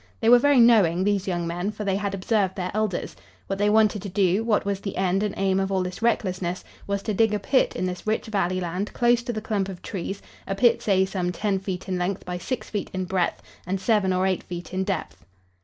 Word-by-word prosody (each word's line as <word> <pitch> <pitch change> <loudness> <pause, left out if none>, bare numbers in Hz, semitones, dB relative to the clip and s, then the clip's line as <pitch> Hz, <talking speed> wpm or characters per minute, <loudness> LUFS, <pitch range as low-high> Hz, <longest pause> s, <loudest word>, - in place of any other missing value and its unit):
They 225 - +2
were 245 0 +8
very 285 0 +4
knowing, 200 -7 +5
these 200 -1 0
young 175 -2 -1
men, 175 +4 -2
for 210 0 -5
they 195 -2 0
had 200 0 -2
observed 195 0 0
their 185 -2 -3
elders. 215 -3 -2 0.3
What 195 0 -4
they 205 0 +3
wanted 215 -1 +3
to 200 - -6
do, 190 +2 +2
what 225 -3 +1
was 200 -1 -1
the 200 -1 -5
end 190 +1 +1
and 210 -1 -2
aim 195 0 +1
of 195 0 -1
all 190 -1 +1
this 180 +3 -6
recklessness, 185 -6 0 0.2
was 200 0 -2
to 215 - -1
dig 220 +1 +3
a - - -1
pit 260 +6 +1
in 180 - -1
this 180 +2 -5
rich 215 - 0
valley 185 -4 0
land 180 +3 -3
close 240 0 +3
to 240 0 -4
the 215 - -4
clump 200 -3 -1
of 180 -2 -9
trees, 195 0 -4 0.3
a 195 - -2
pit 240 +3 +3
say 190 -2 +3
some 185 -2 -2
ten 195 +2 -1
feet 190 0 -5
in 185 -1 -1
length 180 +2 -2
by 180 0 -4
six 255 +6 -4
feet 205 -2 -4
in 185 0 -2
breadth 180 -1 -1 0.2
and 190 +1 -1
seven 200 -2 +2
or 185 +1 +1
eight 190 -1 0
feet 175 0 -8
in 190 +1 0
depth. 190 - -4
195 Hz, 245 wpm, -25 LUFS, 185-210 Hz, 0.3 s, were